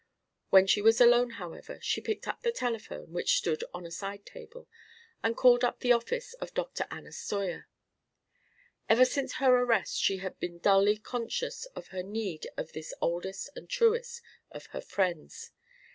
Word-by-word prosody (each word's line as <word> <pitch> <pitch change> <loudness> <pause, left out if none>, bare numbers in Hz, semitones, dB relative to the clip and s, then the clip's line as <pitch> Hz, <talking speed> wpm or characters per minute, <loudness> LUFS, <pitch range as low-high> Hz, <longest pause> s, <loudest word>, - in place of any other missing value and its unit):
When 190 0 +7
she 200 +1 +3
was 225 +2 +5
alone, 240 0 +6
however, 185 - -8
she - - 0
picked 435 - -4
up - - -4
the 475 -1 +1
telephone, 230 - -4
which 175 - +2
stood 160 -2 -1
on 175 0 -8
a 170 - -9
side 200 +3 -6
table, - - -12 0.5
and 225 0 0
called 245 -1 +6
up 245 - +1
the 245 - +3
office 470 - 0
of - - -7
Dr. - - -2
Anna - - -9
Steuer. 195 -4 -4 1.2
Ever 240 +3 +7
since 265 0 -2
her 260 -1 +4
arrest 230 -5 +1
she 195 - +2
had 190 0 -6
been 175 -1 -5
dully 200 +3 +4
conscious 245 - -4
of - - -9
her 185 -1 -4
need 195 -4 -4
of - - -4
this 155 0 -7
oldest 190 +9 -3
and - - -10
truest 475 0 +1 0.3
of - - -10
her - - -4
friends. 190 - -3
225 Hz, 170 wpm, -30 LUFS, 190-295 Hz, 1.2 s, When